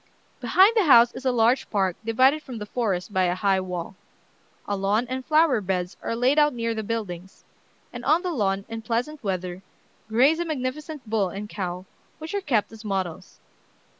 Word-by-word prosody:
"Behind 395 +5 +4
the 430 -5 +3
house 240 -5 +7
is 270 - -9
a 260 - +3
large 240 +2 +2
park 190 -4 0
divided 260 +7 +3
from 255 -5 -8
the 210 - -6
forest 205 -4 -2
by 185 -1 +2
a 175 0 0
high 190 0 +2
wall; 180 -1 -5 0.7
a 205 - -1
lawn 200 +4 +1
and 260 +1 -4
flower 305 -5 +3
beds 180 -1 -2
are 230 - -3
laid 255 +5 +3
out 295 -3 +3
near 230 -1 -1
the 220 - -3
buildings; 195 -5 -5 0.5
and - - -7
on 330 +4 +3
the 360 - -2
lawn, 195 -6 -1
in 225 0 -6
pleasant 240 +7 -3
weather, 185 -2 -3 0.5
graze 265 +9 +4
a 345 - -1
magnificent 295 -1 -5
bull 210 -3 0
and 205 +3 -7
cow, 180 -3 -5 0.3
which 315 +3 -8
are 405 - -1
kept 240 - 0
as 225 0 -12
models. 190 -5 -4
225 Hz, 190 wpm, -25 LUFS, 195-265 Hz, 0.7 s, house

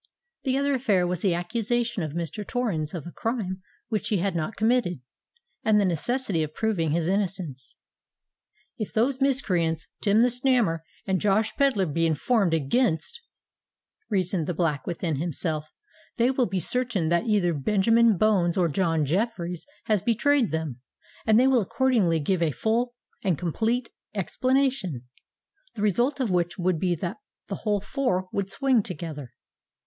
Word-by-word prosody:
The 265 0 +1
other 280 0 +1
affair 215 -9 +2
was 175 -1 -2
the 185 -4 +2
accusation 230 +5 -1
of 155 -3 -4
Mr. 170 +5 -3
Torrens 195 -10 -2
of 165 - -6
a 175 - -7
crime 200 -5 -3 0.3
which 215 -3 -1
he 210 - +1
had 190 0 -1
not 170 +6 -2
committed, 220 - +1 0.6
and 215 -1 +4
the 200 - +3
necessity 190 - 0
of 155 -1 -4
proving 200 -8 0
his 165 +2 0
innocence. 185 - -2 1.0
"If 215 - -3
those 255 +4 +1
miscreants 180 - +1 0.2
Tim 210 +2 +4
the 245 - +5
Snammer 245 -9 +2 0.3
and 190 -2 0
Josh 210 +1 +2
Pedler 270 -9 +2
be 165 +1 +1
informed 190 - +1
against," 165 - 0 0.9
reasoned 185 -5 0
the 180 - -2
Black 150 -5 -1
within 170 -3 -2
himself, 155 -1 -2 0.5
"they 240 +2 +3
will 255 -2 +1
be 190 - -1
certain 230 -4 0
that 170 +7 +1
either 200 -6 +2
Benjamin 215 - +3
Bones 190 -4 +2
or 175 -2 +3
John 165 -1 +1
Jeffreys 180 - -2 0.2
has 215 -4 +1
betrayed 240 +3 +2
them, 155 -6 -3 0.5
and 220 +1 +6
they 255 - +5
will 265 -3 +4
accordingly 230 -6 +2
give 170 +4 0
a 165 - +3
full 235 - 0 0.3
and 185 -7 +1
complete 225 - -1 0.2
explanation, 245 - 0 0.7
the 210 - -3
result 240 - +2
of 245 -7 0
which 175 -1 0
would 180 -2 0
be 180 0 +1
that 160 - -4 0.3
the - - -3
whole 210 -2 0
four 195 -3 -1
would 200 -1 -1
swing 250 +4 +2
together. 160 - -6
195 Hz, 155 wpm, -26 LUFS, 170-235 Hz, 1.0 s, and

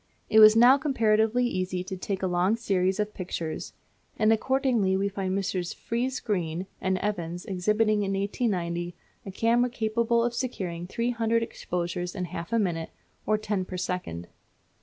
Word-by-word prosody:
It 220 - +6
was 215 0 +9
now 245 +4 +7
comparatively 230 -4 +2
easy 185 -4 -2
to 190 +1 -5
take 190 +1 -4
a - - +3
long 180 +3 +2
series 190 -4 0
of 210 0 -1
pictures; 170 -3 -5 0.4
and 220 0 +4
accordingly 235 -5 +1
we 200 +1 +1
find 195 -1 -2
Messrs. 190 -3 -2
Friese 250 +3 -2
Greene 180 -4 -2 0.2
and 190 0 +1
Evans 175 -4 -3
exhibiting 210 +2 +1
in 195 -1 -1
1890 180 -4 -2 0.3
a - - -4
camera 235 +5 +2
capable 235 0 +1
of 240 0 0
securing 185 -9 -4
three 235 +5 -1
hundred 230 -1 +1
exposures 175 -3 -4
in 185 -2 -2
half 170 +2 -7
a 230 - +2
minute, 170 -6 -1 0.4
or 215 - +3
ten 210 -3 -2
per 185 0 -6
second. 175 - -4
200 Hz, 160 wpm, -27 LUFS, 180-230 Hz, 0.4 s, was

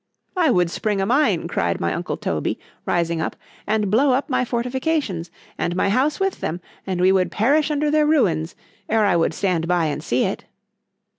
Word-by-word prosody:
——I 345 -4 +3
would 180 -7 +2
spring 210 0 -1
a 195 - +1
mine, 265 +8 +2
cried - - -1
my - - 0
uncle - - -3
Toby, - - -2 0.3
rising 170 -1 0
up,——and 210 +5 -3
blow 260 +5 +4
up 275 +3 -1
my 255 - +2
fortifications, 245 - -2 0.3
and 175 - -1
my 190 - +1
house 265 +8 +1
with 385 -1 -1
them, 165 +3 -2 0.3
and 185 -2 -2
we 185 +1 +5
would 190 -1 +2
perish 285 +8 +2
under 300 0 0
their 305 0 +3
ruins, 170 - +1 0.3
ere 220 -1 +3
I 190 -3 +3
would 165 - +1
stand 175 -4 0
by 175 -2 +2
and 150 0 -3
see 125 -3 +1
it. - - -3
210 Hz, 190 wpm, -22 LUFS, 175-280 Hz, 0.3 s, we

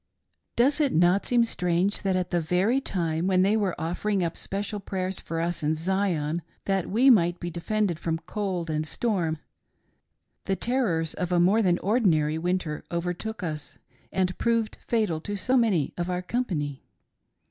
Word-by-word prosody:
Does 275 +6 +3
it 285 -3 +2
not 175 +4 +3
seem 240 -1 +4
strange 180 -2 0
that 195 -2 0
at 180 -1 -1
the 175 -1 +1
very 190 +11 +2
time 170 -6 -1
when 185 -1 +4
they 200 +3 +3
were 200 -7 0
offering 180 +4 -1
up 170 -1 -2
special 205 +2 -3
prayers 190 -1 -3
for 165 - -4
us 170 +1 -1
in 155 +1 +1
Zion, 170 -2 0 0.2
that 195 -2 0
we 250 +7 +5
might 175 -6 +3
be 175 - -4
defended 180 0 -1
from 165 -1 -1
cold 180 -1 -3
and 155 0 -1
storm, 175 -7 -1 1.1
the 195 - 0
terrors, 190 -8 0
of 180 0 -3
a 175 - +3
more 195 +6 +4
than 180 -4 +3
ordinary 165 -9 +2
winter 175 -3 -2
overtook 180 +5 -3
us 155 -3 -5 0.3
and 185 -1 0
proved 230 -2 +1
fatal 215 -9 +1
to 205 +5 -4
so 255 +7 +1
many 215 - +2
of 175 +1 -1
our 180 0 -2
company 165 - -2
180 Hz, 170 wpm, -26 LUFS, 170-210 Hz, 1.1 s, we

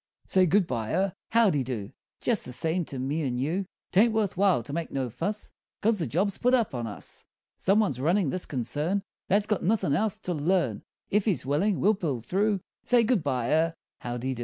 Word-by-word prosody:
Say 185 -1 +3
good 195 +3 +4
bye 115 -7 -3
er 190 +1 +1 0.2
howdy 205 - +3
do 115 -4 -5 0.3
Jest 235 -3 +1
the - - -5
same 165 +7 0
to 135 - -6
me 140 +5 -1
and 125 -4 -1
you; 175 +8 -1 0.2
'Taint 220 +6 +5
worth 210 -3 0
while 185 -9 +3
to 140 - -7
make 165 0 -2
no 130 -3 -2
fuss, 205 - -3 0.3
'Cause 215 -1 +2
the 160 - -1
job's 190 - 0
put 250 +1 +4
up 230 - 0
on 120 -2 -3
us! 105 - -8 0.3
Some 195 +3 +2
one's 140 - -1
runnin' 170 0 +2
this 185 - -3
concern 150 - -1 0.2
That's 200 +2 +3
got 210 -2 0
nothin' 195 -7 +1
else 215 +6 +1
to 180 - -2
learn 155 - +1 0.3
If 205 0 +2
he's 195 - +1
willin', 175 +9 +1
we'll 210 +3 +4
pull 160 - -2
through. 195 - 0 0.2
Say 245 -2 +4
good 225 -3 +2
bye 130 -5 -1
or 160 +1 +2 0.2
howdy 120 +2 -3
do! 120 - -8
175 Hz, 210 wpm, -27 LUFS, 135-205 Hz, 0.3 s, Taint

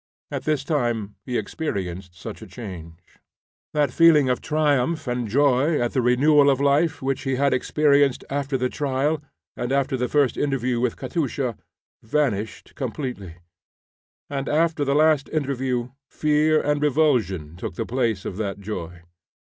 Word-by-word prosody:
At - - -4
this 150 -3 0
time 120 -8 -1
he 125 -1 -1
experienced 95 - -4
such - - -8
a - - -9
change. 85 -8 -9 0.8
That 145 -4 +2
feeling 155 -5 +5
of 125 - 0
triumph 150 0 +1
and 125 -2 -2
joy 140 +5 +3
at 120 0 -1
the 130 - +2
renewal 140 +4 +4
of 135 -1 +2
life 145 +2 +2
which 135 0 -1
he 135 -1 -1
had 140 +1 +2
experienced 140 0 +2
after 140 -1 -1
the 125 0 0
trial 145 +3 -1 0.3
and 120 +1 -3
after 135 0 +1
the 125 -1 -1
first 145 -2 +2
interview 130 -4 0
with 125 -1 0
Katusha, 135 -7 -2 0.5
vanished 110 -4 -2
completely, 125 - -5 0.9
and 140 -1 -3
after 160 -1 +2
the 140 0 +1
last 155 -2 +3
interview 130 -5 -1 0.2
fear 155 +1 +2
and 145 -1 0
revulsion 120 - +1
took 85 - -6
the 115 - -3
place 115 -6 -1
of 95 - -5
that 100 -2 -3
joy. 90 -4 -6
135 Hz, 150 wpm, -23 LUFS, 120-145 Hz, 0.9 s, feeling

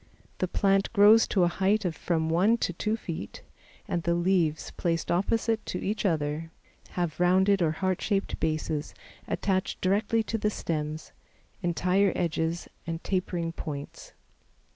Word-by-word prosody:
The 185 - +1
plant 195 +1 +2
grows 215 +1 +7
to 190 - +2
a - - +5
height 195 +4 +1
of 170 -3 -1
from 160 -1 -1
one 185 +8 +3
to 180 - -1
two 215 +6 -1
feet, 160 - -7 0.4
and 175 - -1
the 170 +1 +1
leaves, 170 -3 +1
placed 165 -2 -1
opposite 220 +5 +1
to - - -2
each 210 +1 0
other, 155 -1 -1 0.5
have 175 -3 -1
rounded 190 +2 +4
or 160 -2 +2
heart 185 +2 -1
shaped 200 -2 -1
bases 155 -1 -2 0.3
attached 190 -1 -1
directly 205 +4 +1
to 225 0 -3
the 210 - +1
stems, 155 -5 -4 0.5
entire 180 +2 +2
edges 165 0 -1 0.2
and 165 0 -4
tapering 180 -3 -1
points. 145 -3 -7
180 Hz, 145 wpm, -28 LUFS, 165-200 Hz, 0.5 s, grows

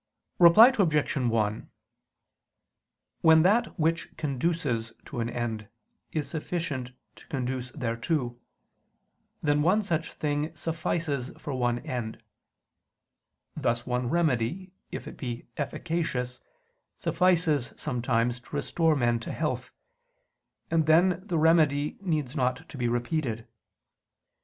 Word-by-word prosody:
Reply 210 +9 +9
Obj. 155 -7 +2
1: 115 -5 0 1.5
When 160 -1 +7
that 215 +2 +2
which 165 +2 0
conduces 135 -5 -1
to - - -6
an 115 0 -1
end 115 -3 -3 0.4
is 155 -2 -2
sufficient 150 -6 -3 0.2
to - - -17
conduce 130 -3 -3
thereto, 120 +1 -2 1.0
then 150 -1 +3
one 190 +7 +3
such 165 -4 -2
thing 150 +1 -2
suffices 155 -5 -2
for 150 -2 -5
one 120 -2 +1
end: 120 -3 -4 1.3
thus 120 +1 0
one 125 -1 -1
remedy, 165 +3 0 0.2
if - - -6
it - - -9
be 120 -2 -5
efficacious, 140 -4 -2 0.6
suffices 165 -7 +2
sometimes 120 0 0
to 120 - -10
restore 165 -2 +2
men 120 -3 +2
to 115 - -6
health, - - -2 1.0
and 160 -2 +2
then 175 +3 +4
the 175 - 0
remedy 155 -2 +3
needs 155 -7 -1
not 125 -2 -1
to - - -10
be 125 -2 -1
repeated. 120 -1 -1
145 Hz, 115 wpm, -28 LUFS, 120-165 Hz, 1.5 s, Reply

